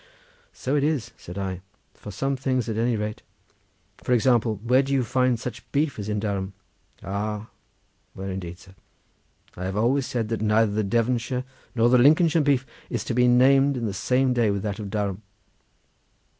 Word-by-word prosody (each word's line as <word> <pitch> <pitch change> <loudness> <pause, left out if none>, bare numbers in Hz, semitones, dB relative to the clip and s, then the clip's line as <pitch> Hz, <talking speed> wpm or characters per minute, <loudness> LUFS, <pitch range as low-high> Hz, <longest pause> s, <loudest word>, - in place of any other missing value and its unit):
"So 135 +3 -2
it 145 - +2
is," 145 -6 0
said 90 +3 -10
I; 95 -2 -3 0.3
"for - - -11
some 135 +8 -1
things, 130 -2 -1
at 110 - -2
any 115 +2 +1
rate. 105 0 -4 0.8
For 125 - 0
example, 120 -3 +2
where 125 +3 +4
do 135 0 -4
you 135 -2 +2
find 125 0 +1
such 125 - -7
beef 145 -4 0
as 105 0 -4
in 105 0 -1
Durham?" 100 -2 -3 0.5
"Ah, 105 +3 -3 0.7
where 95 0 -5
indeed, 90 -2 -6
sir? 95 0 -17 0.8
I 90 - -5
have 95 +2 -3
always 125 +5 +2
said 115 -3 -2
that 115 -2 -2
neither 110 0 +3
the 105 +1 0
Devonshire 120 +4 0 0.3
nor 115 0 +4
the 125 +1 +5
Lincolnshire 155 +4 +5
beef 140 -3 +2 0.2
is - - -2
to - - -3
be 125 +1 +4
named 135 +3 +5
in 120 - -2
the 105 - -2
same 125 +6 +1
day 120 -3 +2
with 100 -1 -1
that 105 -1 -3
of 105 -2 -5
Durham." 100 -1 -2
115 Hz, 185 wpm, -25 LUFS, 105-130 Hz, 0.8 s, the